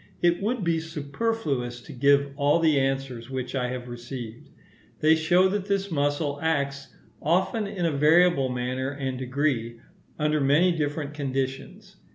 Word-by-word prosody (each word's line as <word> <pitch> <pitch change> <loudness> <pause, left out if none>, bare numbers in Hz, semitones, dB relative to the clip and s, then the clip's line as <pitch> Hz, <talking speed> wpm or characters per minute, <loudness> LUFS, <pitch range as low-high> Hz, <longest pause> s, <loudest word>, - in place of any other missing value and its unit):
It 175 +1 +3
would 220 +1 -1
be 165 -1 +1
superfluous 150 - -3
to - - -11
give 140 +2 +3
all 145 +2 +3
the 160 -4 +3
answers 135 -3 -2
which 130 -1 -4
I 125 -2 0
have 125 -1 -5
received. 120 -1 -8 0.5
They 155 +1 +5
show 175 +4 +4
that 200 0 -2
this 200 -1 -1
muscle 145 -1 0
acts, 140 -3 -2 0.3
often 190 +7 +1
in 195 -4 -3
a 165 - +2
variable 155 -1 +4
manner 125 +1 -2
and 135 -2 -4
degree, 130 -3 -1 0.4
under 150 -1 +1
many 150 +7 +4
different 150 -2 -2
conditions. 140 +8 -4
145 Hz, 150 wpm, -26 LUFS, 130-170 Hz, 0.5 s, They